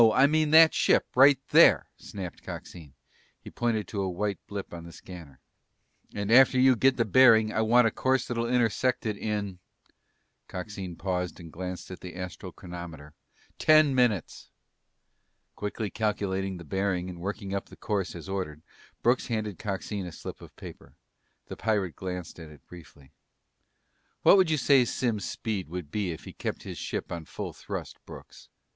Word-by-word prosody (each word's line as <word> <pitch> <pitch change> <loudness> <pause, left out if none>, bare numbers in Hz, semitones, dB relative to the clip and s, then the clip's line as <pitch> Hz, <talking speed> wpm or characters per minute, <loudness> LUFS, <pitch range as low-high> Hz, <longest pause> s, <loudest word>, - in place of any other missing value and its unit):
I 135 - +6
mean 155 +1 +2
that 160 +1 +8
ship, - - +3
right 135 +2 +7
there," - - +6
snapped 95 -4 -8
Coxine. 80 -6 -10 0.4
He - - -12
pointed 110 -5 -1
to 100 - -3
a 95 - -1
white 100 +3 -2
blip 100 -3 -6
on 85 -1 -7
the 85 - -10
scanner. 80 -5 -12 0.8
"And 100 +1 -2
after 130 +1 +6
you 130 0 +6
get 130 +3 +3
the 115 - +2
bearing 110 -1 +5
I 110 - +1
want 120 +2 +5
a 115 - +2
course 130 +2 +1
that'll 115 0 -2
intersect 125 +1 +1
it 110 -2 -1
in" 100 -3 -3 0.9
Coxine 95 -1 -6
paused 90 0 -3
and 85 -2 -11
glanced 90 +1 -6
at 95 - -8
the 90 -1 -9
astral 90 -1 -7
chronometer 85 -4 -10 0.5
"ten 155 -2 +5
minutes!" 120 -8 0 1.1
Quickly 105 0 -4
calculating 95 -3 -2
the 85 - -9
bearing 95 +2 -1
and 90 -2 -8
working 100 +1 -4
up 100 - -3
the - - -14
course 95 -5 -3
as 85 - -9
ordered, 90 -6 -4 0.4
Brooks 125 +2 +2
handed 110 -5 -3
Coxine 100 -1 -4
a - - -7
slip - - -9
of - - -14
paper. - - -12 0.5
The - - -8
pirate 100 -6 -1
glanced 90 -2 -6
at 80 -2 -10
it 75 -3 -17
briefly. 80 -5 -15 1.1
"What - - +8
would 185 -3 +4
you 155 - +2
say 135 -1 +5
Simms' 115 -3 -2
speed 105 -8 -4
would 85 -4 -6
be 100 -4 -1
if 80 - -8
he - - -10
kept - - -5
his - - -7
ship - - -4
on 85 -2 -5
full - - -6
thrust, - - -7
Brooks?" - - -13
100 Hz, 170 wpm, -28 LUFS, 90-115 Hz, 1.1 s, that